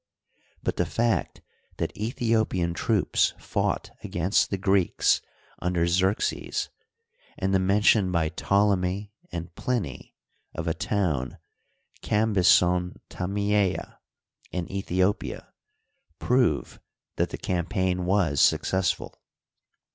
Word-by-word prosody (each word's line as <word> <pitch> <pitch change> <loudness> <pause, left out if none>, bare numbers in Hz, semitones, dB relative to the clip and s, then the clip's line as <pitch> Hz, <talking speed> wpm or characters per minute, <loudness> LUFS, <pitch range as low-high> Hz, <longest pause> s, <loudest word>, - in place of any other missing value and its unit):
But - - -1
the - - +2
fact 115 0 -1 0.3
that - - -2
Aethiopian 110 -6 0
troops 105 +4 +1
fought - - -2
against 90 +3 +1
the 100 - -1
Greeks 95 -1 +2 0.4
under 90 -1 0
Xerxes, 95 +4 0 0.7
and 95 0 -1
the 95 - +4
mention 100 0 +3
by 85 -3 +1
Ptolemy 100 +1 0 0.2
and 85 0 -6
Pliny 100 - -3 0.4
of 80 +1 -4
a 80 - +1
town, 80 -13 -1 0.6
Cambyson 90 -4 +3 0.2
Tamteta, 100 +1 -1 0.5
in 90 -2 -2
Aethiopia, 95 +1 -1 0.7
prove 125 - +1 0.4
that - - +1
the - - -5
campai^ 90 +1 -1
was 90 -6 +2
successful. 95 -2 +1
95 Hz, 95 wpm, -26 LUFS, 90-105 Hz, 0.7 s, the